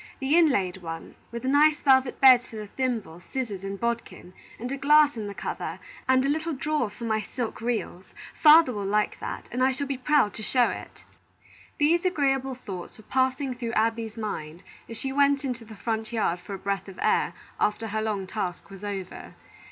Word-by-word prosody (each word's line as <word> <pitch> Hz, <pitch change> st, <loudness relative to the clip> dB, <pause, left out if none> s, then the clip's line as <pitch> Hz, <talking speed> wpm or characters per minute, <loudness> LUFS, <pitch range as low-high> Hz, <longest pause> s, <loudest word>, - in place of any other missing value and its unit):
The 275 Hz, +3 st, +2 dB
inlaid 255 Hz, -, +3 dB
one, 165 Hz, -3 st, -7 dB, 0.2 s
with 235 Hz, +1 st, -6 dB
nice 295 Hz, +3 st, +4 dB
velvet 260 Hz, -2 st, +4 dB
beds 255 Hz, -2 st, +7 dB
for -, -, -12 dB
the 215 Hz, -1 st, -5 dB
thimble, 220 Hz, -7 st, -3 dB
scissors, 220 Hz, -8 st, -4 dB
and 195 Hz, 0 st, -5 dB
bodkin, 235 Hz, -6 st, -4 dB, 0.2 s
and 245 Hz, +3 st, -5 dB
a -, -, -1 dB
glass 290 Hz, +1 st, +5 dB
in 215 Hz, -2 st, -4 dB
the 200 Hz, -, -7 dB
cover, 170 Hz, +2 st, -4 dB, 0.3 s
and 260 Hz, 0 st, +4 dB
a -, -, +2 dB
little 315 Hz, +3 st, -1 dB
drawer 295 Hz, -3 st, -1 dB
for 210 Hz, +3 st, -11 dB
my 220 Hz, -1 st, 0 dB
silk 230 Hz, +1 st, -5 dB
reels. 225 Hz, -6 st, -3 dB, 0.3 s
Father 310 Hz, -4 st, +7 dB
will 205 Hz, -2 st, -3 dB
like 210 Hz, +1 st, 0 dB
that, -, -, -6 dB
and 250 Hz, -, -2 dB
I 260 Hz, -, +5 dB
shall 265 Hz, +2 st, -2 dB
be 275 Hz, -2 st, -3 dB
proud 280 Hz, -5 st, +3 dB
to -, -, -7 dB
show 245 Hz, +3 st, +3 dB
it." -, -, -8 dB, 0.7 s
These 330 Hz, +4 st, +3 dB
agreeable 270 Hz, -7 st, +1 dB
thoughts 190 Hz, -8 st, -8 dB
were 220 Hz, -, -14 dB
passing 260 Hz, +2 st, 0 dB
through 240 Hz, -2 st, -5 dB
Abby's 225 Hz, 0 st, 0 dB
mind 175 Hz, -6 st, -5 dB, 0.3 s
as 230 Hz, -, -7 dB
she 265 Hz, +2 st, -3 dB
went 280 Hz, 0 st, +3 dB
into 245 Hz, -3 st, -4 dB
the 220 Hz, 0 st, -11 dB
front 220 Hz, +1 st, -3 dB
yard 210 Hz, -6 st, 0 dB
for 195 Hz, +3 st, -7 dB
a -, -, -6 dB
breath 200 Hz, +1 st, -3 dB
of 195 Hz, -, -10 dB
air, -, -, +2 dB, 0.3 s
after 220 Hz, +1 st, 0 dB
her 215 Hz, +1 st, -1 dB
long 210 Hz, -3 st, -2 dB
task 185 Hz, -2 st, -4 dB
was 195 Hz, +1 st, -11 dB
over. 195 Hz, -3 st, -6 dB
235 Hz, 200 wpm, -26 LUFS, 205-270 Hz, 0.7 s, beds